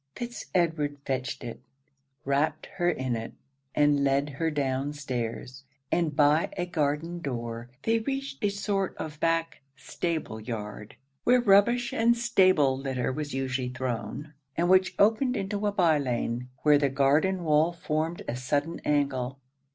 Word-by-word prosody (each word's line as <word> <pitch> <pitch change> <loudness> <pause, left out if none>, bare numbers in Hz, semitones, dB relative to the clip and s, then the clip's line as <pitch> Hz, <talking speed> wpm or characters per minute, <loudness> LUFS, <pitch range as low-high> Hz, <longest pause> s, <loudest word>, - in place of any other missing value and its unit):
Fitz 240 0 -6
Edward 155 -5 +1
fetched 130 -2 -3
it, 120 - -6 0.7
wrapt 145 +3 0
her 175 -1 +2
in 130 -7 -1
it, 115 0 -5 0.4
and 145 -1 +3
led 140 +1 +2
her 160 +4 -1
down 140 -1 -1
stairs; 130 -2 -5 0.3
and 165 -4 +1
by 150 +2 +4
a 175 - 0
garden 165 +1 -1
door, 120 -5 -5
they 225 0 +2
reached 270 +1 -4
a 205 - +3
sort 200 -1 -2
of 155 -1 -6
back 165 0 0
stable 160 -10 -3
yard, 105 -2 -6 0.3
where 250 +1 +5
rubbish 235 +2 +4
and 235 +1 +3
stable 185 - +4
litter 130 -2 -2
was 145 +1 -4
usually 130 -1 -1
thrown, 125 +3 -4 0.2
and 175 +1 +2
which 185 0 +4
opened 225 +5 +3
into 205 +1 -2
a - - +1
bye 170 -6 +3
lane, 125 -2 -2
where 150 -1 +6
the 140 -1 +2
garden 145 +8 +2
wall 155 +1 +3
formed 165 0 -2
a 120 - -2
sudden 145 +6 -1
angle. 140 -3 0
150 Hz, 150 wpm, -28 LUFS, 130-180 Hz, 0.7 s, where